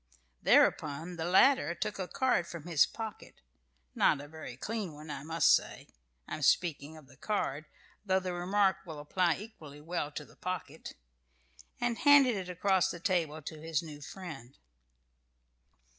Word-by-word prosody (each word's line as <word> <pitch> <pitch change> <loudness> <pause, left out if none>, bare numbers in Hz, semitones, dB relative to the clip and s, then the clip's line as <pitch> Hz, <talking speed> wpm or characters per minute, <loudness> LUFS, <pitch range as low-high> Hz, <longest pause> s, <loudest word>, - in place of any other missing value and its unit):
Thereupon 160 +4 +2
the 160 - -3
latter 180 - +4
took 200 +5 -4
a 185 - -3
card 250 -9 +1
from 170 -3 -8
his 170 -4 +4
pocket, 220 -2 -8 0.6
not 145 - +3
a 145 - -9
very 145 -5 -9
clean 210 +1 -4
one, 150 +1 -9
I 135 - -5
must 160 +3 +4
say - - -5 0.4
(I - - -4
am - - -10
speaking 160 -3 +1
of 155 - -14
the - - -18
card, 155 -8 -2 0.4
though 190 -2 +2
the 185 -1 -4
remark 190 +2 +2
will 160 -5 -8
apply 170 +3 +1
equally 160 -9 -11
well 155 -1 -3
to 150 - -6
the - - -20
pocket) 180 -4 -6 0.8
and 240 -1 -1
handed 280 -5 +6
it 185 -2 -5
across 185 +1 +2
the 175 - -5
table 165 -5 -1
to 155 +1 -7
his 160 -1 -1
new 150 -2 -9
friend. 145 -8 -9
170 Hz, 160 wpm, -31 LUFS, 150-190 Hz, 0.8 s, handed